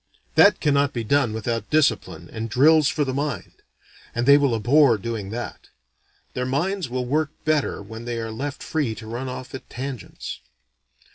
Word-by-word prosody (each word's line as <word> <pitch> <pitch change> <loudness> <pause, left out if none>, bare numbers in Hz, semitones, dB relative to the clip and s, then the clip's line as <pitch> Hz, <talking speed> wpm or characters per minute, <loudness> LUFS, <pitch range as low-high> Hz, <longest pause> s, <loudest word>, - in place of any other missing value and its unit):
That - - +6
cannot 140 -2 +2
be 115 - -2
done 130 0 +2
without 115 +1 -3
discipline 110 - +1
and 115 0 -4
drills 150 +5 +5
for 145 0 +1
the 130 - -2
mind; 140 -1 -4 0.5
and 120 +1 0
they 140 +1 +8
will 140 -4 +3
abhor 120 +2 +4
doing 105 -2 -4
that; 120 +3 -6 0.6
their 125 0 -2
minds 170 +5 -1
will 125 0 -2
work 150 +4 +1 0.2
better 155 -8 0
when 110 +3 -9
they 120 -1 -3
are 115 -1 -4
left 135 +5 -5
free 145 -9 -1
to 110 - -10
run 120 +4 -4
off 125 0 -7
at 135 - -8
tangents. 130 -2 -6
125 Hz, 170 wpm, -23 LUFS, 115-145 Hz, 0.6 s, they